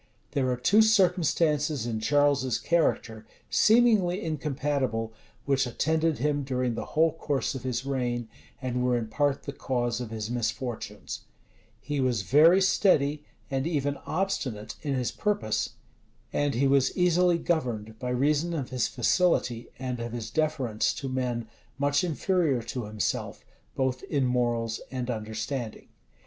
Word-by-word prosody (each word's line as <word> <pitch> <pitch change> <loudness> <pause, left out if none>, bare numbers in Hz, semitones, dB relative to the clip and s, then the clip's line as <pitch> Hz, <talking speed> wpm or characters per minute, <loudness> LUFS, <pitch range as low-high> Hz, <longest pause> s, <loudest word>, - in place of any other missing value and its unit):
There 130 -2 0
are 125 - 0
two 190 - +4
circumstances 165 - +2
in 115 -2 -2
Charles's 140 0 +2
character, 120 -9 0 0.3
seemingly 215 -6 +4
incompatible, 140 -7 -1 0.3
which 135 -2 +2
attended 160 +5 +1
him 145 +3 0
during 130 -2 -1
the - - -4
whole 160 +1 +5
course 145 -4 -1
of 130 - -5
his 125 0 -3
reign, 120 -3 -1 0.3
and 125 -1 -2
were 125 -1 +2
in 110 -2 -4
part 145 +3 0
the 140 - -5
cause 120 -3 -1
of 120 - -5
his 110 0 -4
misfortunes: 115 -4 -4 0.5
he 145 +3 -3
was 125 -5 +1
very 165 - +6
steady, 150 -6 +3 0.3
and 135 +2 0
even 145 -4 0
obstinate 130 - -2
in 145 -3 -1
his 125 -2 -1
purpose; 160 - -1 0.6
and 145 -2 +1
he 135 +4 +2
was 135 -1 +2
easily 180 -1 +4
governed, 115 -11 -2
by 125 - -3
reason 150 +6 +1
of 135 -6 -4
his 125 -2 +1
facility, 125 -4 +1
and 125 -1 -4
of 115 0 -5
his 115 -2 -5
deference 150 -9 0
to 135 - -4
men 125 -3 -2 0.3
much 145 +2 +2
inferior 165 -6 +1
to 120 0 -4
himself 105 0 -3 0.3
both 130 -1 0
in 140 -3 0
morals 120 -2 0
and 125 -1 -3
understanding. 110 +2 -5
130 Hz, 145 wpm, -27 LUFS, 120-155 Hz, 0.6 s, very